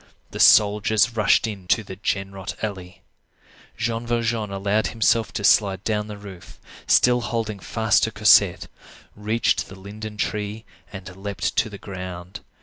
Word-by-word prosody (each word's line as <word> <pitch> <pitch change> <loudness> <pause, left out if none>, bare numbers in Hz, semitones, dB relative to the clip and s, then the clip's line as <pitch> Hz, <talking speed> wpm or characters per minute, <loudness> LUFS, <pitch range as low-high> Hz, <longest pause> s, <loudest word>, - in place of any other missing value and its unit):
The - - -7
soldiers 105 +2 +4
rushed 110 +1 +3
into 105 0 -1
the 95 -2 -9
Genrot 95 0 -4
alley. 95 -3 -6 0.7
Jean 115 +1 -3
Valjean 115 -2 -1
allowed 100 +2 0
himself 115 0 +1
to 100 - -4
slide 100 -2 +3
down 105 -1 -1
the 105 -1 -8
roof, 95 -3 -12 0.3
still 125 0 +4
holding 110 -3 -3
fast 110 +1 +1
to - - -4
Cosette, - - +4 0.5
reached 110 +3 0
the 95 - -12
linden 105 +2 -8
tree, 105 +1 -3 0.3
and 95 -2 -9
leaped 100 +1 -4
to 110 - +2
the 100 - -9
ground. 90 -2 -8
105 Hz, 145 wpm, -23 LUFS, 95-110 Hz, 0.7 s, soldiers